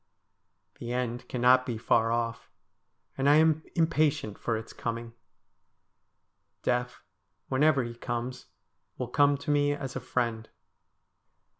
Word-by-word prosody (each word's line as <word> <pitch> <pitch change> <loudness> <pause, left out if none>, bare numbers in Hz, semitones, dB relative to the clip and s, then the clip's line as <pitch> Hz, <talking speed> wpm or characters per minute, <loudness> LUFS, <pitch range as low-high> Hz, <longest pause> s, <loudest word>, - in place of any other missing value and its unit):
The 120 0 -4
end 125 -1 -3
cannot 125 +1 +4
be 120 -3 -4
far 115 0 +2
off, 115 -1 -2 0.7
and 135 +1 +2
I 145 - +7
am 160 0 +4
impatient 155 -8 +1
for 115 -2 -1
its 110 0 -8
coming. 115 0 -4 1.5
Death, 125 0 -1 0.5
whenever 135 0 +3
he 120 0 -5
comes, 120 +1 -5 0.5
will 125 - -4
come 145 +2 +3
to 140 +1 -3
me 145 0 +3
as 135 -3 -6
a - - -2
friend. 115 -3 -2
125 Hz, 125 wpm, -29 LUFS, 115-145 Hz, 1.5 s, I